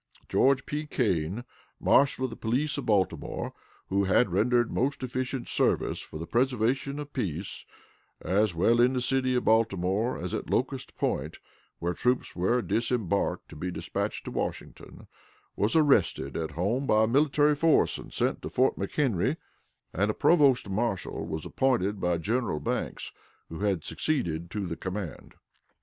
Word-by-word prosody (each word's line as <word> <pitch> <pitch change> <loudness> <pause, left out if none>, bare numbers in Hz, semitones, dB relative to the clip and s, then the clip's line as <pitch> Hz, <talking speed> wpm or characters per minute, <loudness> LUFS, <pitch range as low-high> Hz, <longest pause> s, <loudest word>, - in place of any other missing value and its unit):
George 135 0 +3
P. 150 +1 -4
Kane, 100 - 0 0.4
Marshal 140 -1 +3
of 130 - -1
the - - -6
Police 130 +8 -1
of - - -6
Baltimore, 100 -4 0 0.4
who 100 +1 +2
had 95 +2 +3
rendered 120 +5 +2
most 135 +2 -1
efficient 130 0 -3
service - - +1
for - - -8
the 80 - -5
preservation 125 +4 0
of 145 -1 -7
peace, 95 - -4 0.5
as 100 -1 +1
well 115 +8 +4
in 125 +2 +4
the 130 - 0
city 130 0 +1
of 125 - 0
Baltimore 110 0 +2
as - - -5
at - - -4
Locust - - -2
Point, - - -2 0.4
where 85 +1 -2
troops 125 +6 0
were 115 +7 +1
disembarked 110 -1 -1
to - - -11
be 90 +4 -4
dispatched 90 - -3
to - - -5
Washington, - - -5 0.5
was 105 +7 +1
arrested 145 - +3
at 80 -1 -2
home 115 +10 0
by 110 0 +4
a - - +3
military 145 +3 +3
force, 155 +2 +3
and - - -11
sent - - 0
to - - -5
Fort 130 +1 +2
McHenry, 100 - 0 0.6
and 100 +4 +1
a 105 - -1
provost 140 - +4
marshal 100 0 -2
was 80 0 -4
appointed 105 -7 0
by 90 -1 +1
General 110 -1 -1
Banks, - - -3 0.4
who 80 - -7
had 100 -5 0
succeeded 85 - -1
to 100 +1 -3
the 85 -2 -4
command. 95 0 -6
115 Hz, 160 wpm, -28 LUFS, 95-130 Hz, 0.6 s, well